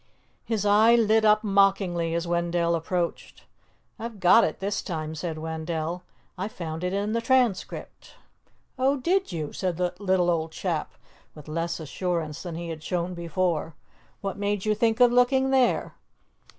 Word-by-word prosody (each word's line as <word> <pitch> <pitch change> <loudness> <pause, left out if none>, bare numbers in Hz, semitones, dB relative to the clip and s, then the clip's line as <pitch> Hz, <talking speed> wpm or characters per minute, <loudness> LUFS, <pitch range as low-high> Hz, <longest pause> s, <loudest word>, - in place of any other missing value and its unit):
His 220 -3 -2
eye 215 +3 +6
lit 220 -1 +3
up 215 0 +4
mockingly 195 -5 +2
as 170 0 -1
Wendell 170 0 +1
approached. 170 +1 -3 0.6
"I've 225 -2 -6
got 190 +5 +6
it - - -1
this 200 +1 -2
time," 155 -3 -4
said 160 +1 -4
Wendell. 160 +2 -4 0.4
"I 190 - -1
found 165 -5 -6
it 180 - -1
in 200 +2 -1
the 230 +1 0
Transcript." 245 -5 -1 0.6
"Oh, 270 +2 +2
did 360 - 0
you?" 155 -4 -4
said 180 -3 -2
the 180 0 0
little 185 -3 +2
old 160 -1 -1
chap 165 -1 -3 0.4
with 150 -1 -12
less 165 +3 -2
assurance 160 -1 -3
than 175 -3 -6
he 170 0 -5
had 160 -1 -6
shown 175 +2 -2
before. 170 -2 -2 0.5
"What 195 0 -4
made 205 -1 -1
you 215 - +3
think 220 +1 +1
of 245 -1 +6
looking 260 +2 +3
there?" 260 -2 +2
180 Hz, 160 wpm, -26 LUFS, 165-215 Hz, 0.6 s, eye